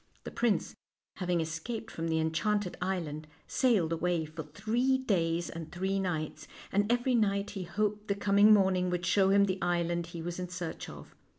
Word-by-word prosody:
The -, -, -7 dB
prince, 235 Hz, -4 st, 0 dB, 0.4 s
having 180 Hz, -2 st, 0 dB
escaped 165 Hz, +9 st, -4 dB
from 165 Hz, 0 st, -3 dB
the 160 Hz, -1 st, +1 dB
enchanted 180 Hz, +5 st, 0 dB
island, 165 Hz, -5 st, -3 dB, 0.2 s
sailed 205 Hz, -11 st, +2 dB
away 170 Hz, -1 st, 0 dB
for 155 Hz, +1 st, -7 dB
three 225 Hz, -, 0 dB
days 170 Hz, -9 st, 0 dB
and 165 Hz, -1 st, -7 dB
three 190 Hz, +2 st, -1 dB
nights, 160 Hz, -5 st, -3 dB, 0.2 s
and 205 Hz, +3 st, +2 dB
every 245 Hz, +1 st, +2 dB
night 200 Hz, -3 st, +1 dB
he 195 Hz, -3 st, -5 dB
hoped 210 Hz, +4 st, -1 dB
the 200 Hz, -, +1 dB
coming 200 Hz, +1 st, +5 dB
morning 190 Hz, -3 st, +4 dB
would 175 Hz, -1 st, -2 dB
show 195 Hz, 0 st, +4 dB
him 200 Hz, +1 st, +5 dB
the 190 Hz, -1 st, -2 dB
island 170 Hz, -1 st, 0 dB
he 170 Hz, -1 st, -7 dB
was 175 Hz, +1 st, -4 dB
in 180 Hz, -1 st, -4 dB
search 175 Hz, -2 st, -5 dB
of. -, -, -11 dB
185 Hz, 180 wpm, -31 LUFS, 170-205 Hz, 0.4 s, coming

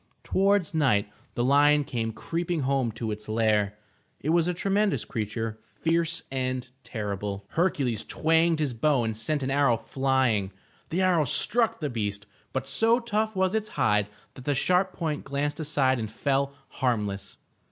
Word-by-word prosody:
Towards 195 Hz, -3 st, +2 dB
night 115 Hz, -10 st, +2 dB, 0.2 s
the 120 Hz, -, 0 dB
lion 145 Hz, +3 st, +5 dB
came 115 Hz, -5 st, -2 dB
creeping 165 Hz, +9 st, -2 dB
home 135 Hz, -3 st, +1 dB
to 110 Hz, 0 st, -3 dB
its 105 Hz, 0 st, -6 dB
lair. 105 Hz, -2 st, +1 dB, 0.4 s
It 150 Hz, -, -3 dB
was 170 Hz, 0 st, +3 dB
a 180 Hz, -, +1 dB
tremendous 200 Hz, +2 st, +1 dB
creature, 110 Hz, 0 st, -3 dB, 0.2 s
fierce 165 Hz, 0 st, +1 dB
and 130 Hz, -1 st, -2 dB
terrible. 100 Hz, -3 st, -4 dB
Hercules 140 Hz, -, 0 dB
twanged 165 Hz, +1 st, +2 dB
his 150 Hz, -5 st, -1 dB
bow 130 Hz, +2 st, +2 dB
and 110 Hz, -1 st, -2 dB
sent 140 Hz, +6 st, -1 dB
an 130 Hz, -, -1 dB
arrow 140 Hz, -4 st, +3 dB
flying. 130 Hz, -7 st, 0 dB, 0.4 s
The 180 Hz, +4 st, 0 dB
arrow 175 Hz, -5 st, +3 dB
struck 225 Hz, -, +2 dB
the 150 Hz, -, 0 dB
beast, 105 Hz, -3 st, -3 dB, 0.3 s
but 130 Hz, 0 st, -3 dB
so 225 Hz, -, +3 dB
tough 220 Hz, -2 st, -1 dB
was 190 Hz, 0 st, +1 dB
its 215 Hz, -1 st, -1 dB
hide 105 Hz, -1 st, +3 dB, 0.3 s
that 130 Hz, -, -12 dB
the 145 Hz, -, +1 dB
sharp 180 Hz, +7 st, +2 dB
point 155 Hz, -5 st, -3 dB
glanced 145 Hz, +2 st, -2 dB
aside 140 Hz, -4 st, +2 dB
and 110 Hz, -2 st, -3 dB
fell 140 Hz, +3 st, 0 dB
harmless. 105 Hz, -6 st, -2 dB
135 Hz, 160 wpm, -27 LUFS, 110-165 Hz, 0.4 s, lion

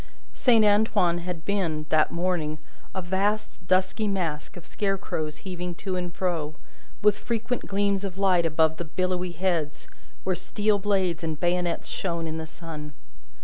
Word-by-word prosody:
Saint 230 Hz, -4 st, +5 dB
Antoine 205 Hz, -4 st, +4 dB
had 175 Hz, -1 st, -5 dB
been, 170 Hz, -7 st, 0 dB
that 155 Hz, -1 st, +4 dB
morning, 170 Hz, -3 st, 0 dB, 0.4 s
a 190 Hz, -, -2 dB
vast 195 Hz, +1 st, -1 dB
dusky 185 Hz, +3 st, +2 dB
mass 170 Hz, -7 st, -1 dB
of 175 Hz, -, -10 dB
scarecrows 195 Hz, -6 st, -2 dB
heaving 180 Hz, -2 st, -4 dB
to 190 Hz, +1 st, -3 dB
and 180 Hz, -1 st, -3 dB
fro, 165 Hz, -5 st, -1 dB, 0.5 s
with 210 Hz, -1 st, +5 dB
frequent 235 Hz, +1 st, -2 dB
gleams 200 Hz, 0 st, +1 dB
of 190 Hz, -2 st, -4 dB
light 190 Hz, -3 st, +4 dB
above 160 Hz, 0 st, +3 dB
the 175 Hz, -, -3 dB
billowy 180 Hz, +2 st, -1 dB
heads, 170 Hz, -4 st, -1 dB, 0.4 s
where 185 Hz, -1 st, +1 dB
steel 205 Hz, +3 st, +1 dB
blades 190 Hz, -4 st, +1 dB
and 160 Hz, -2 st, -2 dB
bayonets 175 Hz, -1 st, 0 dB
shone 170 Hz, -3 st, -2 dB
in 160 Hz, 0 st, -3 dB
the 160 Hz, -, -5 dB
sun. 155 Hz, -3 st, -8 dB
180 Hz, 150 wpm, -26 LUFS, 165-195 Hz, 0.5 s, Saint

